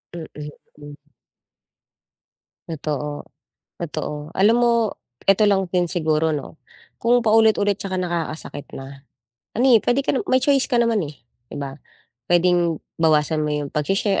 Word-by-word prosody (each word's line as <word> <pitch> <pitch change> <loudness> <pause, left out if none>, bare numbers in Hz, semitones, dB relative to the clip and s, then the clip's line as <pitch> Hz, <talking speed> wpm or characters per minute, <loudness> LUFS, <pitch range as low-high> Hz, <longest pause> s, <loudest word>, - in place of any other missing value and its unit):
Mm, 165 -2 -6 0.5
hmm. 145 0 -11 1.7
Totoo. 150 -2 -4 0.5
Totoo. 150 +2 -5
Alam 205 +4 +4
mo 240 -1 +4 0.5
eto 195 +2 +4
lang 195 -1 +2
din 180 -1 +1
siguro 160 -2 +1
'no, 145 +2 -8 0.4
kung 240 0 +3
paulit-ulit 215 -2 +4
tsaka 190 -2 -4
nakakasakit 165 -4 -4
na, 135 +1 -10 0.5
ano, 245 - +2
eh, - - +6
puwede 245 +3 +2
ka - - +1
na - - +1
may 260 0 +4
choice 275 -1 +3
ka 250 - 0
naman, 230 -5 +2
eh, 145 - -10 0.4
'di - - -6
ba? 135 -1 -5 0.5
Puwedeng 175 -2 +2 0.2
bawasan 155 -1 +3
mo 150 - -1
yung 145 -1 -2
pagshi-share, 195 +6 0
175 Hz, 140 wpm, -22 LUFS, 150-210 Hz, 1.7 s, eh